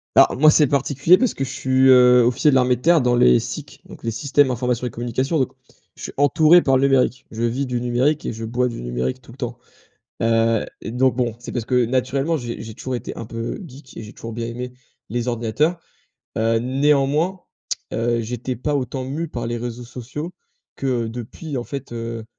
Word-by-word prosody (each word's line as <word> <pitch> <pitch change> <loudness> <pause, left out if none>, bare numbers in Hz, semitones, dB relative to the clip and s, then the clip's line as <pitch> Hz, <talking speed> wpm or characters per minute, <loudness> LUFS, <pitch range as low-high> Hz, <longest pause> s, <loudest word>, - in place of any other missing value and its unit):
Bah, - - +8
moi, 155 +2 +7
c'est 150 -1 +4
particulier, 140 +5 +3
parce 255 +2 +1
que 135 - -3
je 130 - -4
suis, 130 0 +2
heu, 125 -1 +7
officier 130 +5 +3
de - - +2
l'armée 125 -1 +4
de 120 - -12
terre 170 0 +4
dans 125 -1 +2
les 60 - +5
SIC, - - -7
donc - - -13
les 115 - -1
systèmes 135 +3 +2
informations 125 0 -1
et 120 - -3
communication, 130 +6 -1
donc 130 - -1 0.4
je - - -12
suis - - -5
entouré 155 +5 +5
par 135 -1 +3
le 130 - +1
numérique. 130 -1 +1
Je 110 - -6
vis 120 +4 0
du 125 -2 -2
numérique 125 +5 +1
et - - -2
je 115 +1 -6
bois 125 +3 0
du 120 - -6
numérique, 60 - -3
tout - - -14
le 125 - -15
temps. 120 -2 -4 0.7
Heu, 115 -1 +2 0.2
donc 125 +2 +1
bon, 120 -3 0
c'est 120 - -8
parce 120 - -2
que, 125 0 +2
naturellement, 135 +6 0
j'ai 120 -4 -5
j'ai 110 -1 -8
toujours 130 0 -4
été - - -7
un 115 - -6
peu 115 +1 -5
geek 135 -1 -14
et - - -6
j'ai 105 0 -10
toujours 115 -1 -8
bien 115 0 -3
aimé 125 +1 -6 0.4
les 120 +1 -2
ordinateurs. 120 +9 0 0.6
Heu, 115 +1 +2
néanmoins, 145 +7 +1 0.5
heu, 115 +1 0
j'étais 120 +2 -4
pas 145 +4 -2
autant 130 -1 -2
mû 150 +6 -4
par 120 -5 -5
les 120 - -2
réseaux 120 +1 -5
sociaux 130 +8 -7 0.4
que 125 -4 -1
depuis 120 +6 -6
en 120 - -4
fait, 135 +2 -7
heu, 115 -1 -5
125 Hz, 210 wpm, -21 LUFS, 115-135 Hz, 0.7 s, Bah